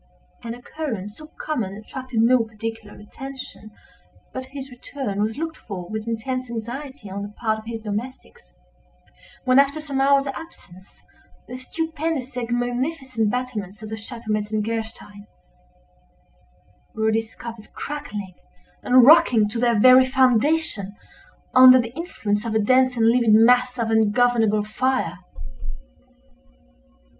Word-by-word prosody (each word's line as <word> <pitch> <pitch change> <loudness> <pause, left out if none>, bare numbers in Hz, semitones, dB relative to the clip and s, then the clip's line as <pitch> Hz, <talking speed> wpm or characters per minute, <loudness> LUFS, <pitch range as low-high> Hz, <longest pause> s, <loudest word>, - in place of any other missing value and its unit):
An 230 0 -5
occurrence 240 -6 -6
so 310 - -11
common 225 -11 -3
attracted 240 +2 -4
no 250 +2 +5
particular 225 -1 -6
attention, 265 -1 -9 0.6
but 260 -1 -5
his 270 0 -9
return 245 -4 -5
was 220 +1 -1
looked 320 +1 -4
for 185 -5 -7
with 215 +1 -4
intense 255 +2 -3
anxiety 245 +2 -6
on 195 +1 -5
the 205 - -5
part 220 -2 -1
of 220 - -14
his 230 -1 -5
domestics, 215 - -7 0.9
when, 255 +1 +5
after 280 +2 +2
some 280 -3 -2
hours' 275 0 +4
absence, 270 - -10 0.4
the 250 - -7
stupendous 315 -1 -4
and 240 -2 -3
magnificent 245 -1 -1
battlements 220 -5 -4
of 215 - -7
the 220 - -4
Chateau 225 0 -7
Metzengerstein, 215 0 -3 1.7
were 220 0 +1
discovered 225 0 -5
crackling 215 -11 -6 0.5
and 250 -1 +6
rocking 265 -8 +6
to 230 +2 -4
their 235 -2 +2
very 255 +3 +8
foundation, 255 -4 +1 0.6
under 255 0 +9
the 235 -1 -3
influence 220 - -3
of 230 -2 -3
a - - +4
dense 255 +3 +3
and 225 - +3
livid 230 -2 +4
mass 250 +3 +4
of 230 -1 -1
ungovernable 220 -1 +3
fire. 215 -5 -1
235 Hz, 130 wpm, -23 LUFS, 215-260 Hz, 1.7 s, under